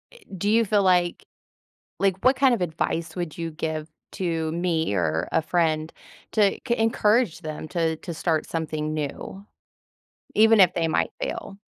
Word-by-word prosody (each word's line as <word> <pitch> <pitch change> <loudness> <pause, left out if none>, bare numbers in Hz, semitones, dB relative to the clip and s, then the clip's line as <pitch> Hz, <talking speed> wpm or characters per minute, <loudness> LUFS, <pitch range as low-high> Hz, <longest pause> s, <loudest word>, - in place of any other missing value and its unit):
eh - - -15 0.2
do 200 - -2
you 230 +2 +4
feel 205 0 +2
like 180 -2 +2 0.8
like, 195 -1 +1
what 260 - +6
kind 270 -2 +4
of 235 - 0
advice 165 -1 -2
would 175 -4 -5
you 165 -1 -4
give 155 -1 -4 0.2
to 165 -3 -2
me 165 - 0
or 80 -2 0
a - - +3
friend 160 -1 0 0.4
to 205 -3 +3
c 235 - +2
encourage 225 -4 +2
them 155 -2 -6
to 165 -2 0
to 170 +2 -7
start 160 -1 -1
something 155 -2 -3
new, 155 +6 -5 0.9
even 220 +1 +6
if 180 -1 +6
they 165 -1 0
might 160 - +1
fail. 195 - -5
170 Hz, 165 wpm, -24 LUFS, 160-195 Hz, 0.9 s, what